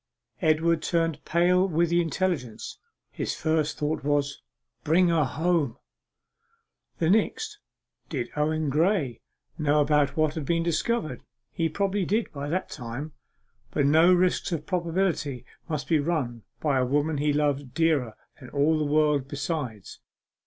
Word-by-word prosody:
Edward 160 0 +2
turned 165 -3 0
pale 180 +3 +3
with 170 -1 +1
the 175 0 +4
intelligence. 165 - -3 0.3
His - - -3
first 155 -1 0
thought 150 0 -2
was, 145 -1 0 0.4
'Bring 175 +3 +4
her 165 -3 +3
home!' 155 -3 0 1.2
The 165 - +1
next 420 - 0 0.5
did 125 -6 -3
Owen 155 0 0
Graye 155 - +1 0.4
know 150 -1 +3 0.3
what 155 -1 +2
had 160 - -4
been 165 +4 0
discovered? 165 - -1 0.3
He 165 -1 -1
probably 195 +3 0
did 215 +5 0
by 145 0 -5
that 185 +4 -2
time, 130 +4 -6 0.6
but 145 - 0
no 160 +5 +6
risks 180 0 +2
of 160 -3 -3
probability 170 -6 -1 0.2
must 150 -3 -3
be 160 -2 +3
run 140 -8 -2
by 140 -4 +1
a - - +2
woman 145 +4 0
he 150 +1 +2
loved 145 -3 -1
dearer 150 -9 +1 0.2
than 125 -4 -11
all 150 +2 +2
the - - +1
world 150 -2 +2
besides. 140 - -4
155 Hz, 140 wpm, -26 LUFS, 145-170 Hz, 1.2 s, no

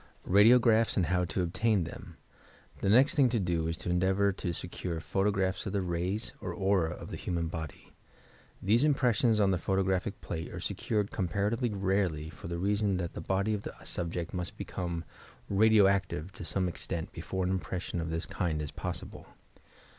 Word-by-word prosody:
"RADIOaRAPHS," 115 +3 +5
AND 95 - +3
HOW 90 0 +1
TO 90 +1 -1
OBTAIN 100 +2 +1
THXH 85 - -9 0.6
The 95 - 0
next 130 +7 +6
thing 135 -4 +4
to 120 -1 +1
do 85 -4 0
is 80 0 -2
to 90 - -3
endeavour 95 +3 +3
to 95 -2 -3
secure 85 0 -4
photo 95 +6 +1
graphs 95 -1 -1
of 95 - -3
the 100 -2 0
rays 90 +5 -2
or - - -3
aura 95 -4 +2
of - - -9
the - - -4
human 85 -2 -2
body. 80 -3 -7 0.7
These 110 +7 +4
impressions 125 -6 +3
on 100 -2 +4
the 90 - +1
photographic 95 +1 0
plafe 80 0 -5
arc - - -6
secured 105 -2 -1
com 95 -4 -1
paratively 105 - 0
rarely, 95 -6 0
for - - -10
the 85 0 -3
reason 100 +1 +1
that 85 -2 -3
the - - -6
body 100 +3 0
of 105 - -2
the - - -7
subject 85 -1 -3
must 90 -2 -4
become 85 -2 -4 0.5
"radio 110 +1 +6
active" 95 -3 0
to - - -9
some 95 -2 0
extent 85 -1 -4
be - - -6
fore 95 0 -2
an 90 - 0
impression 90 -2 -3
of 80 - -3
this 80 +1 -2
kind 85 -5 -2
is 75 -1 -3
possible. - - -6
95 Hz, 190 wpm, -30 LUFS, 85-105 Hz, 0.7 s, next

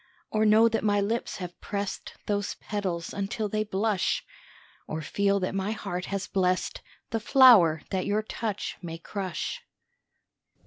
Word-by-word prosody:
Or 215 0 +3
know 220 +2 +6
that 225 -1 0
my 205 -1 +3
lips 220 +4 -1
have 180 -2 -8
pressed 200 -1 -4
Those 205 -1 -1
petals 185 -5 -3
until 200 +2 -2
they 215 +1 0
blush, 205 -1 0 0.6
Or 155 0 -4
feel 200 +5 +1
that 185 - -1
my 195 +2 -1
heart 180 -4 -4
has 200 0 -3
blessed 185 -2 0 0.3
The 225 - 0
flower 215 - +6
that 190 -2 -1
your 210 +1 +1
touch 215 -1 -4
may 165 -2 -6
crush? 195 - -4
200 Hz, 145 wpm, -27 LUFS, 185-215 Hz, 0.6 s, know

